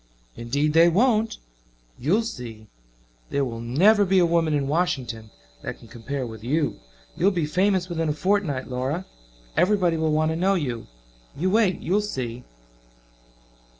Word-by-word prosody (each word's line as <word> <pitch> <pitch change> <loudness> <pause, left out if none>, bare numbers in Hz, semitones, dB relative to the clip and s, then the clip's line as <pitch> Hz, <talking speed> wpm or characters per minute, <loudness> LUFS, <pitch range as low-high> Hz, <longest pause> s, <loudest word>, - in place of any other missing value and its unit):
"Indeed 140 +6 -1
they 165 +2 +6
won't. 225 +4 +2 0.6
You'll 185 - +2
see. 120 - -7 0.6
There 140 -1 0
will 115 -2 -5
never 180 - +4
be 190 0 +2
a 180 - +5
woman 165 -2 +2
in 140 -2 0
Washington 130 -9 -1 0.3
that - - -6
can 115 - -16
compare 125 +4 -5
with 110 -2 -9
you. 145 +5 0 0.4
You'll 190 - +3
be 175 -6 -1
famous 185 +3 +1
within 165 -3 -2
a - - +1
fortnight, 170 -6 0
Laura. 135 +8 -2 0.5
Everybody 180 0 +3
will 160 -1 +1
want 155 +1 +2
to - - -2
know 190 +4 +2
you. 125 -10 -3 0.5
You 185 +5 0
wait 205 -4 +2
you'll 195 +5 +1
see." 125 - -4
160 Hz, 150 wpm, -24 LUFS, 130-185 Hz, 0.6 s, they